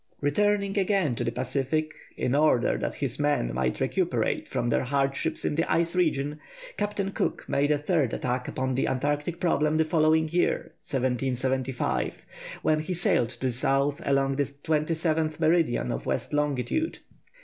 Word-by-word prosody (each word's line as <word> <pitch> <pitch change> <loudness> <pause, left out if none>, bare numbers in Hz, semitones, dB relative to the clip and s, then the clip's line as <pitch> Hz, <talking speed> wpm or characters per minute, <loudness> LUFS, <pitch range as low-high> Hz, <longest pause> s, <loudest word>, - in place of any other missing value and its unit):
Returning 200 +7 +1
again 190 - +2
to 115 - -2
the - - -1
Pacific 140 +4 -1 0.2
in 125 - 0
order 145 -4 +3
that - - -3
his 135 -2 -2
men 145 - +1
might 65 0 -1
recuperate - - 0
after - - +1
their 120 - +1
hardships 135 +1 -1
in - - +1
the 165 +3 0
ice 170 +1 +1
region, 150 -4 0 0.4
Captain 205 -1 -2
Cook - - -2
made 140 +1 +1
a 150 - +3
third 150 -4 +1
attack 125 0 -2
upon 130 0 -2
the 130 - 0
Antarctic 145 +5 -1
problem 155 -3 +2
the 160 - +3
following 160 0 +3
year 175 +3 0
1775 130 0 -1 0.4
when 155 0 +3
he 170 +4 -3
sailed 125 -8 +2
to 120 -1 -12
the 130 -1 +1
south 135 +3 +1
along 135 -1 +1
the 145 - +3
27th 155 +2 -1
meridian 160 -6 +2
of - - -4
west - - -2
longitude. 150 - 0
145 Hz, 160 wpm, -27 LUFS, 130-160 Hz, 0.4 s, order